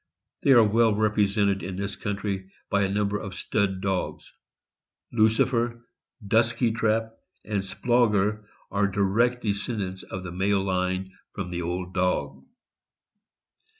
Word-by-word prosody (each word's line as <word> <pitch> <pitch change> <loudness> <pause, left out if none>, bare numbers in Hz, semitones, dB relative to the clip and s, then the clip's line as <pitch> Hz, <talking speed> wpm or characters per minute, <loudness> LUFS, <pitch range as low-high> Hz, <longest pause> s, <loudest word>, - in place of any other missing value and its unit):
They - - +1
are 120 -3 +8
well 110 0 +3
represented 100 -2 +2
in 95 +2 -5
this 100 +1 -3
country 100 -2 -3 0.2
by 100 - +3
a 100 - +1
number 105 +1 0
of 95 -2 -7
stud 95 -1 -1
dogs. 95 -2 -3 0.8
Lucifer, 115 +1 +2 0.4
Dusky 115 +3 +2
Trap, 110 0 0 0.3
and 105 -2 -1
Splauger 105 0 +1 0.3
are 100 0 +2
direct 105 +6 +1
descendants 100 -3 -2
in 95 -1 -5
the 90 - -6
male 95 +2 +1
line 95 0 -1 0.2
from 95 -3 -4
the 90 0 -3
old 90 +2 -3
dog. 90 0 -1
100 Hz, 125 wpm, -26 LUFS, 95-110 Hz, 0.8 s, are